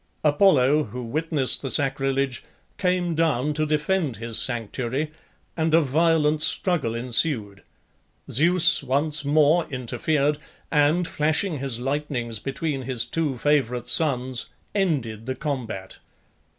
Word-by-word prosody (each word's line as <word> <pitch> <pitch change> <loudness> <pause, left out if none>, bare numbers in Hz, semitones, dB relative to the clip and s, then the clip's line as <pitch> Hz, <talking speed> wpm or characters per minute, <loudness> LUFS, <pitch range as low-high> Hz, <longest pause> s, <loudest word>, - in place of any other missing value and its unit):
Apollo, 150 -3 +3
who 125 0 -7
witnessed 145 +2 0
the 135 - -4
sacrilege, 135 -1 -1 0.4
came 180 -2 0
down 150 -3 0
to 155 +1 -1
defend 150 - -1
his 115 0 0
sanctuary, 125 +4 -1 0.4
and 160 -1 +1
a - - +6
violent 155 +1 +1
struggle 155 - +1
ensued. 115 -4 -1 0.7
Zeus 170 +4 +4
once 145 +3 +1
more 155 +3 +3
interfered, 140 +4 -1 0.3
and, 155 +3 +2
flashing 155 +2 0
his 130 -3 -1
lightnings 125 -4 -3
between 135 +3 -3
his 125 -3 -1
two 145 +1 -2
favourite 125 -3 0
sons, 130 -4 +2 0.3
ended 130 - -2
the 130 - -2
combat. 120 -9 -5
145 Hz, 115 wpm, -24 LUFS, 125-155 Hz, 0.7 s, a